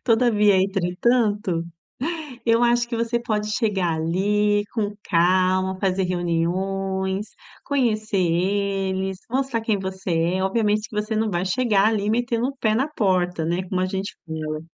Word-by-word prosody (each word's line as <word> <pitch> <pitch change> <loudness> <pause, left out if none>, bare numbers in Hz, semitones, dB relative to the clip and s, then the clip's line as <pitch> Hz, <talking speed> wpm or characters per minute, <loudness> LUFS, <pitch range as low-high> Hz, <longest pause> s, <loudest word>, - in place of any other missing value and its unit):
todavia, 220 -4 +4
entretanto, 195 0 +1 0.8
eu 230 +1 +4
acho 240 0 +3
que 235 - -3
você 230 +1 0
pode 215 -2 -2
chegar 195 -7 0
ali 205 +5 +1
com 210 -3 -2
calma, 185 +1 +2
fazer 190 -1 +1
reuniões, 190 +3 -1 0.4
conhecer 220 -7 0
eles, 190 +1 0
mostrar 260 -2 0
quem 220 -3 0
você 190 -1 -5 0.3
é. 190 - -1
Obviamente, 210 +1 +1
que 210 - -9
você 215 +1 -3
não 220 0 +1
vai 175 0 -1
chegar 210 0 +2
ali 210 -2 0
metendo 235 +1 0
o 275 - -7
pé 215 -3 +1
na 270 +6 +1
porta, 180 - 0
né, 175 +3 -1
como 185 0 -1
a 185 - +1
gente 195 +1 -4
fala. 155 -1 -4
200 Hz, 145 wpm, -23 LUFS, 185-225 Hz, 0.8 s, todavia